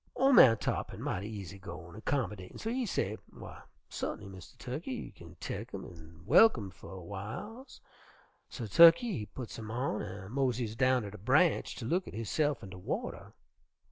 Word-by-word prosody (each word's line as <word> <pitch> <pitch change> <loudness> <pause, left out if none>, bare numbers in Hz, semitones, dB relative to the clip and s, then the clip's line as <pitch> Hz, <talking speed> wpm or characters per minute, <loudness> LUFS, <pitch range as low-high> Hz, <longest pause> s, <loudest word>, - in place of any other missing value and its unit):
"Ol' 270 +2 +4
man 115 - +8
Tarr'pin - - -3
mighty 95 +3 -3
easy 100 -3 -7
goin' 85 -2 -9
an' 110 - -10
commodatin', 105 -9 -2
so 225 - -3
he 250 -1 -1
say, 110 - -1 0.2
'W'y, - - -10 0.3
sut'n'y, 105 - -5
Mistah 95 -4 -12
Tukkey, 130 +7 -6
you 255 - -5
kin 85 0 -14
tek 105 +3 -5
'em 95 - -6
an' 80 -1 -13
welcome 110 - +5
fer 80 - -14
a 95 - -8
w'iles.' 110 - -7 0.7
So 125 - -6
Tukkey 170 - +7
he 105 - -3
putts 125 -3 -8
'em 110 -1 -7
on 120 -1 -1
an' 95 0 -7
moseys 125 -4 0
down 130 0 +3
ter 100 - -6
de 105 - -10
branch 145 - +3
ter 120 - -6
look 180 +9 0
at - - -8
hisse'f 145 +7 0
in 95 - -9
de 90 - -9
water. - - -5
110 Hz, 185 wpm, -32 LUFS, 95-140 Hz, 0.7 s, man